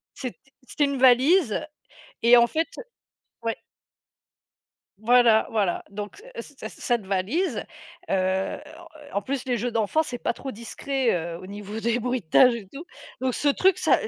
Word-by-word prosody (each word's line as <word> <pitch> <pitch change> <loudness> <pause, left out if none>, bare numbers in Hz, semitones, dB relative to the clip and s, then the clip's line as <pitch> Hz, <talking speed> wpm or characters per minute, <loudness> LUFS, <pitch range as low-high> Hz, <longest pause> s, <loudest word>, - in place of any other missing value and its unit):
C'ét 255 -2 -6 0.3
c'était 295 - +1
une 280 -1 -2
valise 260 - +4 0.6
et 235 +1 +7
en 235 0 +6
fait, 320 +6 -1
heu - - -5 0.6
ouais. 230 -1 -1 1.4
Voilà, 230 -1 +5
voilà 205 -6 0
donc 205 - -7 0.2
cet - - -10
cet - - -5
cette 240 -5 -2
valise, 200 - -1 0.5
heu, 190 0 0 0.5
en - - -3
en - - +1
plus, 260 +4 -4
les 250 -2 0
jeux 240 +3 -2
d'enfants, 230 +8 +1
c'est 250 -5 -5
pas 235 - -1
trop 270 +2 -7
discret, 255 +3 -2
heu, 170 -1 -3
au 185 - -10
niveau 205 +2 -7
des 235 +1 0
bruitages 245 0 +3
et 225 -4 -7
tout. 295 +5 -9 0.3
Donc 260 -1 -1
ce 290 - -1
truc 370 +6 +3
s'a 455 - +2
235 Hz, 160 wpm, -25 LUFS, 205-265 Hz, 1.4 s, et